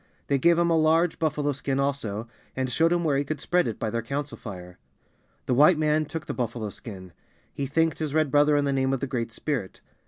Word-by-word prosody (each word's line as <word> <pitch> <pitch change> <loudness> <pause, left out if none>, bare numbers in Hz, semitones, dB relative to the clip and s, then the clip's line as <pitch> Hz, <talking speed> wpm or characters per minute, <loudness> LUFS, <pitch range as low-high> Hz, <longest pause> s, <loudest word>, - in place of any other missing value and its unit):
They 140 -1 +1
gave 170 +4 +4
him 170 0 +2
a - - +4
large 160 +2 +2
buffalo 150 -2 0
skin 135 0 -2
also, 120 -6 -2 0.3
and 130 -1 -2
showed 165 +6 +3
him 175 0 +1
where 145 -4 +2
he - - 0
could 155 +2 -4
spread 180 -3 +1
it 115 - -3
by 110 - -2
their 115 +1 -1
council 140 +4 -4
fire. 90 -6 -9 0.7
The - - 0
White 150 +6 +6
man 155 0 +2
took 155 +1 -6
the - - -4
buffalo 115 -3 -3
skin. 95 -6 -10 0.4
He 140 - -3
thanked 160 +4 +1
his 155 -2 -3
Red 155 -3 +2
brother 145 0 +4
in 145 - +1
the 140 - 0
name 135 0 +1
of 135 - 0
the 135 - -2
Great 120 -4 -3
Spirit. 120 -5 -3
140 Hz, 230 wpm, -26 LUFS, 120-155 Hz, 0.7 s, White